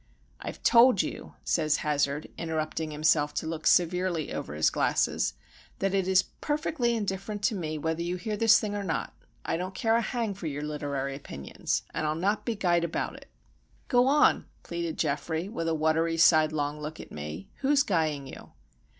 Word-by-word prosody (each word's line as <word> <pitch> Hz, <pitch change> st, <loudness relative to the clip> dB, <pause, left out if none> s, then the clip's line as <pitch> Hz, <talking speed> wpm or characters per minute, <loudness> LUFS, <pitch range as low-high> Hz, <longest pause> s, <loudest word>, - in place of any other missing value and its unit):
"I've -, -, -7 dB
told 235 Hz, -4 st, +6 dB
you," -, -, -7 dB
says 155 Hz, -3 st, +2 dB
Hazard, 145 Hz, 0 st, 0 dB
interrupting 160 Hz, -1 st, -3 dB
himself 150 Hz, -1 st, +2 dB
to -, -, -2 dB
look 160 Hz, 0 st, -3 dB
severely 180 Hz, -2 st, +2 dB
over 75 Hz, -, -5 dB
his 75 Hz, -, +3 dB
glasses, -, -, +1 dB, 0.4 s
"that 195 Hz, 0 st, 0 dB
it 190 Hz, -2 st, +1 dB
is 190 Hz, 0 st, +4 dB
perfectly 295 Hz, -5 st, -1 dB
indifferent 205 Hz, 0 st, -3 dB
to 220 Hz, +1 st, +2 dB
me 155 Hz, -4 st, -3 dB
whether 160 Hz, +2 st, -2 dB
you 175 Hz, +1 st, -2 dB
hear 210 Hz, +4 st, -3 dB
this 220 Hz, 0 st, +6 dB
thing 210 Hz, -1 st, -3 dB
or 205 Hz, -1 st, -3 dB
not. 165 Hz, -4 st, -2 dB, 0.3 s
I -, -, 0 dB
don't 185 Hz, +2 st, -5 dB
care 225 Hz, +4 st, +2 dB
a 230 Hz, -, +3 dB
hang 230 Hz, -2 st, -2 dB
for 190 Hz, -4 st, -6 dB
your 145 Hz, 0 st, -4 dB
literary 145 Hz, -2 st, -3 dB
opinions,—and 140 Hz, -, -4 dB
I'll 155 Hz, -, 0 dB
not 200 Hz, +6 st, 0 dB
be 235 Hz, -, -1 dB
guyed 175 Hz, -4 st, +2 dB
about 170 Hz, -, -2 dB
it." -, -, -13 dB, 0.6 s
"Go 245 Hz, 0 st, +4 dB
on," 295 Hz, +2 st, +4 dB, 0.2 s
pleaded 170 Hz, -2 st, -4 dB
Geoffrey, 160 Hz, +5 st, -1 dB
with 200 Hz, -6 st, -4 dB
a 165 Hz, -, +1 dB
watery, 160 Hz, +1 st, +1 dB
sidelong 155 Hz, -2 st, +3 dB
look 150 Hz, +1 st, -6 dB
at -, -, -10 dB
me. 75 Hz, +5 st, -7 dB
"Who's 275 Hz, 0 st, +3 dB
guying 155 Hz, -, 0 dB
you?" 135 Hz, -, -11 dB
165 Hz, 175 wpm, -28 LUFS, 155-205 Hz, 0.6 s, told